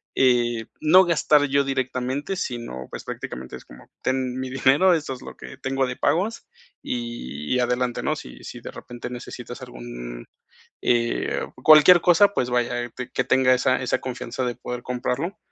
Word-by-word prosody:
eh, 120 -3 +2
no 180 +5 +6
gastar 155 -4 +3
yo 140 0 +2
directamente, 130 +4 -2
sino, 120 - -5
pues, - - -7
prácticamente 65 +1 -7
es - - -16
como: - - -15
"Ten 130 -1 -1
mi 130 0 -4
dinero, 135 +8 +4
eso 155 -5 -1
es 125 - -10
lo - - -10
que - - -11
tengo 135 0 -1
de 125 - -5
pagos 205 +7 0 0.3
y 120 - -3
adelante, 125 0 0
¿no? - - 0
Si 60 0 -11
si - - -8
de - - -8
repente 120 0 -8
necesitas 120 0 -8
algún, - - -8 0.6
eh, 120 -1 0 0.2
cualquier 155 +3 +8
cosa", 180 +4 +5
pues, 125 - 0
vaya, 120 0 -1
que 125 +1 -3
tenga 130 -1 +4
esa 130 +1 +2
esa 125 - 0
confianza 125 0 -4
de 120 -1 -2
poder 125 0 -6
comprarlo. 125 +8 -3
125 Hz, 160 wpm, -24 LUFS, 120-135 Hz, 0.6 s, cualquier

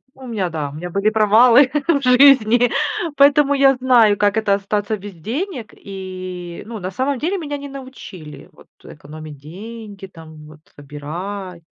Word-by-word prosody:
У 265 -1 -13
меня, 205 -6 -2
да, 150 -3 -4
у - - -12
меня 175 +3 -7
были 200 +4 +1
провалы 230 +5 +5 0.2
в 285 -4 +2
жизни, 250 -2 +5 0.5
поэтому 285 0 +4
я 275 -1 +4
знаю, 240 -5 +4
как 205 +2 +1
это 210 -2 +2
остаться 205 +2 -2
без 200 -1 -10
денег. 245 - -5
И, 185 -2 -8
ну, 230 -1 -7
на 185 -1 -5
самом 260 +6 -2
деле, 365 +7 -2
меня 290 -3 -5
не 285 0 -8
научили, 255 - -11
вот, - - -20 0.2
э, - - -11
экономить 150 0 -11
деньги, 200 +6 -10
там, 160 -4 -14
вот, 155 0 -15 0.2
выбирать. 170 +6 -7
205 Hz, 165 wpm, -19 LUFS, 175-255 Hz, 0.5 s, провалы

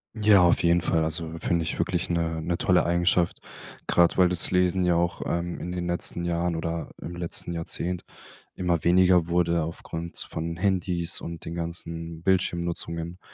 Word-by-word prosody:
Ja, 105 -3 +5
auf 85 -1 +3
jeden 85 0 +4
Fall. 80 -2 +1
Also, 80 +1 -2
finde 85 +1 0
ich 80 - -3
wirklich 90 -1 -1
'ne 80 -1 -1
'ne 85 +1 -2
tolle 90 -1 +3
Eigenschaft, 85 0 +2 0.5
grad 85 -1 +3
weil 90 -1 +5
das 90 -2 +3
Lesen 90 0 +2
ja 85 -1 +3
auch, 85 +1 0
ähm, 85 0 -2
in 90 - -5
den 90 -1 -3
letzten 85 0 +1
Jahren 85 0 -1
oder 80 -1 -3
im 85 - -7
letzten 85 0 -2
Jahrzehnt 85 +1 -2 0.5
immer 85 -3 0
weniger 90 -1 +4
wurde 85 -1 +1
aufgrund 80 +1 -6
von 85 +1 -2
Handys 90 -2 0
und 85 -1 -7
den 80 - -5
ganzen 85 -1 -5
Bildschirmnutzungen. 85 -2 -1
85 Hz, 165 wpm, -26 LUFS, 85-90 Hz, 0.5 s, Ja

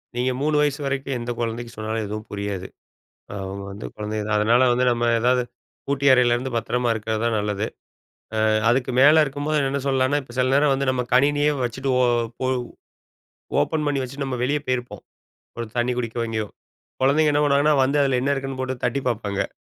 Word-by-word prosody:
நீங்க 125 +1 0
3 150 +1 +1
வயசு 145 0 0
வரைக்கும் 135 0 -2
எந்த 120 +1 -4
குழந்தைக்கு 115 0 -3
சொன்னாலும் 110 0 -3
எதுவும் 105 +1 -5
புரியாது. 100 -2 -4 0.6
நாம 100 0 -5
வந்து 100 +2 -8
குழந்தைக 105 0 -3
தான். 105 - +1
அதனால 120 +4 +4
வந்து 125 +1 +2
நம்ம 120 0 0
ஏதாவது 125 +1 +2 0.4
பூட்டிய 140 -1 +4
அறையிலருந்து 125 +1 +2
பத்திரமா 120 +1 0
இருக்கிறது 110 0 -3
தான் 115 -1 +1
நல்லது. 105 0 -1 0.8
அ - - +3 0.2
அதுக்கு 130 +1 +1
மேல 155 +3 +7
இருக்கும்போது, 145 +2 -2
என்னன்னு 135 0 -1
சொல்லலான்னா, 135 +2 +2
இப்ப 125 -2 -14
சில 130 0 +2
நேரம் 140 0 +4
வந்து 135 0 0
நம்ம 125 -1 -1
கணினியே 145 +3 +3
வச்சுட்டு 130 +3 -2
ஓ - - +4 0.4
ஒ - - +1 1.1
ஓப்பன் 150 - -1
பண்ணி 140 -2 0
வச்சுட்டு 140 +2 -5
நம்ம 130 -2 -3
வெளிய 145 +3 0
போயிருப்போம். 125 -1 -3 0.6
ஒரு 115 -1 -4
தண்ணீ 120 +1 +1
குடிக்கவோ, 115 0 -3
எங்கேயோ 110 -1 -2 0.6
குழந்தைங்க 150 +3 +4
என்ன 145 - +2
பண்ணுவாங்கன்னா 145 +1 +3
வந்து 140 +3 +1
அதில 135 -2 +1
என்ன 140 - +2
இருக்குன்னு 135 -1 -5
போட்டு 130 -1 -4
தட்டிப் 130 +1 0
பாப்பாங்க. 100 -4 -2
125 Hz, 175 wpm, -23 LUFS, 115-140 Hz, 1.1 s, மேல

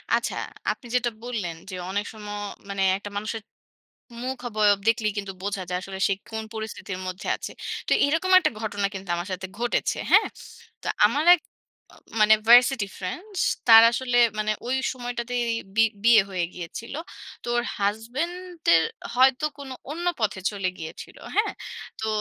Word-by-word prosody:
আচ্ছা, - - -1 0.4
আপনি 245 - -8
যেটা 245 -1 +2
বললেন 215 -9 -3
যে, 185 - -5
"অনেক 205 +2 -1
সময় 215 -1 -11 0.5
মানে 195 -1 -1
একটা 205 +1 -8
মানুষের 215 +2 -3 0.8
মুখ 260 +1 -3
অবয়ব 210 -2 +3
দেখলেই 225 -2 +2
কিন্তু 200 -1 -4
বোঝা 200 -1 -2
যায় 180 0 -1
আসলে 190 0 -7
সে - - +2 0.2
কোন 220 0 -3
পরিস্থিতির 220 -3 -5
মধ্যে 185 0 -5
আছে।" - - -7 0.4
তো - - +2
এরকম 325 +6 0
একটা 370 - +1
ঘটনা 205 -2 -1
কিন্তু 195 0 -7
আমার 175 +3 -4
সাথে 185 +1 -4
ঘটেছে। 240 0 0
হ্যাঁ? - - +6 0.5
তো - - -8 0.2
আমার 285 +8 0
এক 355 - -2 0.8
মানে 215 +1 +7
ভার্সিটি 245 -2 +7
ফ্রেন্ডস 360 - -5 0.3
তার 225 -1 +11
আসলে 245 0 +1 0.2
মানে 215 0 +1
ওই 255 +2 +1 0.2
সময়টাতেই 245 -1 -3 0.3
বি 225 - +6 0.2
বিয়ে 230 -3 +7
হয়ে 180 -2 -1
গিয়েছিল। 180 +8 -7 0.5
তো - - -11
ওর 240 - +1
হাসব্যান্ডের 265 - 0 0.3
হয়তো 260 +3 +4
কোনো 270 -2 -7 0.2
অন্য 340 +4 -4
পথে 205 -3 0
চলে 195 -3 -2
গিয়েছিল। 160 -1 -8 0.2
হ্যাঁ? - - +2 0.5
তো 220 - -2
220 Hz, 155 wpm, -25 LUFS, 200-250 Hz, 0.8 s, তার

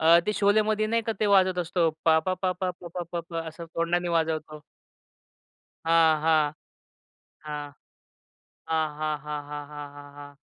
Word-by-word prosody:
अ, 165 +1 +7
ते 210 - +2
शोलेमध्ये 215 +1 +3
नाही 230 +1 +1
का 225 - -1
ते 215 - +3
वाजत 190 -2 +4
असतो 175 -1 +1 0.2
पा-पा, 160 +3 +3
पा-पा, 185 0 -1
प-पा, 175 0 -7
प-पा 170 -1 -3
असं 165 +2 -8
तोंडाने 175 +1 0
वाजवतो. 155 -2 -2 1.3
हां, 165 -2 +5
हां. 155 -2 +3 0.9
हां. 145 -1 -5 1.0
हां, 160 -1 +1
हां, 155 -1 -1
हां, 150 0 -5
हां, 150 0 -4
हां, 145 -1 -7
हां, 145 0 -12
हां. 145 0 -11
165 Hz, 145 wpm, -27 LUFS, 150-180 Hz, 1.3 s, अ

